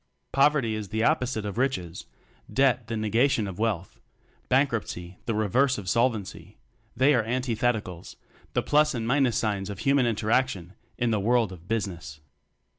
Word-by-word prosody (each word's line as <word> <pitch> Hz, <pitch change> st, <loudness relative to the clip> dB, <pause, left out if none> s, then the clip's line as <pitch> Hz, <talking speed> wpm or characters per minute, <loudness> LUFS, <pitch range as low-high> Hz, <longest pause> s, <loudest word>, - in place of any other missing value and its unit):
Poverty 135 Hz, -4 st, +3 dB
is 105 Hz, -3 st, -5 dB
the 110 Hz, +1 st, -1 dB
opposite 120 Hz, -3 st, +1 dB
of 105 Hz, +3 st, -4 dB
riches; 95 Hz, -11 st, -2 dB, 0.4 s
debt 130 Hz, -3 st, +2 dB
the 115 Hz, -1 st, -3 dB
negation 110 Hz, +2 st, +2 dB
of 95 Hz, 0 st, -7 dB
wealth; 105 Hz, -6 st, -2 dB, 0.5 s
bank 135 Hz, +2 st, +3 dB
ruptcy 90 Hz, -5 st, -5 dB
the 115 Hz, -, 0 dB
reverse 125 Hz, +6 st, +2 dB
of 100 Hz, -3 st, -7 dB
solvency; 115 Hz, -2 st, -1 dB, 0.4 s
they 135 Hz, +4 st, +5 dB
are 120 Hz, -, +3 dB
antithetical 115 Hz, -6 st, -1 dB, 0.5 s
the -, -, 0 dB
plus 150 Hz, -1 st, +3 dB
and 115 Hz, -2 st, -3 dB
minus 130 Hz, -2 st, +2 dB
signs 105 Hz, -3 st, -1 dB
of 100 Hz, -, -6 dB
human 135 Hz, -2 st, +3 dB
interaction 110 Hz, -4 st, 0 dB, 0.2 s
in 120 Hz, -2 st, 0 dB
the 110 Hz, -, +1 dB
world 115 Hz, 0 st, +2 dB
of 90 Hz, -1 st, -12 dB
"Business." 85 Hz, -9 st, -4 dB
115 Hz, 155 wpm, -26 LUFS, 100-130 Hz, 0.5 s, they